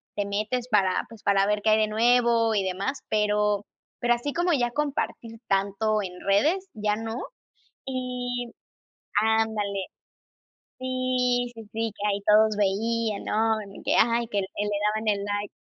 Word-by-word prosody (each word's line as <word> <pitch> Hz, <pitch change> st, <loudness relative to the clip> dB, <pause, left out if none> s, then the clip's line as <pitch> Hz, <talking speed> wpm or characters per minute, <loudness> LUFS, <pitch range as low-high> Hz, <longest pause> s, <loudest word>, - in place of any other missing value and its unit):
te 205 Hz, -, -1 dB
metes 215 Hz, +5 st, -2 dB
para, 195 Hz, -5 st, +2 dB
pues, 225 Hz, -2 st, -13 dB
para 195 Hz, -1 st, +3 dB
ver 210 Hz, 0 st, +1 dB
qué 220 Hz, -, +4 dB
hay 215 Hz, -, +5 dB
de 215 Hz, -, +3 dB
nuevo 230 Hz, 0 st, +3 dB
y 200 Hz, -, +2 dB
demás, 190 Hz, +9 st, -3 dB
pero 210 Hz, -1 st, +1 dB, 0.3 s
pero 240 Hz, 0 st, +3 dB
así 275 Hz, +4 st, -4 dB
como 350 Hz, +1 st, +1 dB
ya 240 Hz, -4 st, +1 dB
compartir 245 Hz, -5 st, -3 dB
tanto 200 Hz, +2 st, +1 dB
en 180 Hz, -, -6 dB
redes, 310 Hz, -, +2 dB
ya 210 Hz, -1 st, 0 dB
no. 225 Hz, +2 st, -4 dB, 0.7 s
Y 250 Hz, -2 st, -3 dB, 0.7 s
Ándale. 215 Hz, -3 st, 0 dB, 0.9 s
Sí, 255 Hz, -1 st, 0 dB
sí, 225 Hz, -, -9 dB
sí, 225 Hz, -1 st, -2 dB
que 205 Hz, +1 st, -2 dB
ahí 200 Hz, 0 st, -1 dB
todos 215 Hz, 0 st, +5 dB
veían, 215 Hz, +2 st, 0 dB
¿no?, 220 Hz, +1 st, +1 dB
y -, -, -11 dB
que, -, -, +1 dB
ay, 235 Hz, +1 st, +3 dB
que 205 Hz, -3 st, 0 dB
le 190 Hz, -, -3 dB, 0.5 s
daban 220 Hz, 0 st, -2 dB
el 200 Hz, -1 st, +1 dB
like. 205 Hz, 0 st, -3 dB
220 Hz, 155 wpm, -26 LUFS, 205-240 Hz, 0.9 s, hay